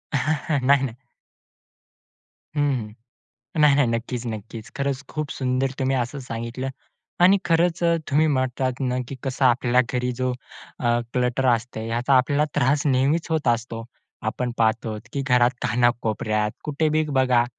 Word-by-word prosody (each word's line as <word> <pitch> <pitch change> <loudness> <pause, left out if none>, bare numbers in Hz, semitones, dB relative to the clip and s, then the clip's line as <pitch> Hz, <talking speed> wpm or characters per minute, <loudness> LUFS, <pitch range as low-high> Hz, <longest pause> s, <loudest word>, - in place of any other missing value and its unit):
नाही 140 -1 +2
ना. 120 - -5 1.6
हं, 145 - +1 0.3
हं. 105 - -15 0.7
नाही, 150 -2 +6
नाही. 140 -3 +3
नक्कीच, 115 +1 -3
नक्कीच, 110 0 -6
खरंच 140 -1 -1
खूप 155 -2 -4
सुंदर 130 0 0
तुम्ही 135 0 +1
असं 125 +3 -2
सांगितलं 115 +3 -4 0.5
आणि 190 +3 +6
खरंच 170 0 +2 0.3
तुम्ही 150 +3 +4
म्हटलात 130 -2 0
ना, 125 -1 0
की 135 - -5
कसं 135 +1 -1
आपल्या 125 0 +4
घरी 125 -1 0
जो 130 0 +1 0.5
अ, 120 0 +1
क्लटर 125 +1 +1
असते. 115 -1 -5
याचा 120 +4 +1
आपल्याला 140 +4 +3
त्रास 140 +4 +2
नेहमीच 140 +5 +2
होत 155 -5 +1
असतो. 115 -1 -1 0.4
आपण 125 +2 -2
पाहतोत 110 -1 0
की 140 - -2
घरात 125 -2 +4
कानाकोपऱ्यात 110 -3 +1
कुठे 150 +1 0
बी 155 - +3
बघा, 130 -3 +3
130 Hz, 140 wpm, -23 LUFS, 120-140 Hz, 1.6 s, नाही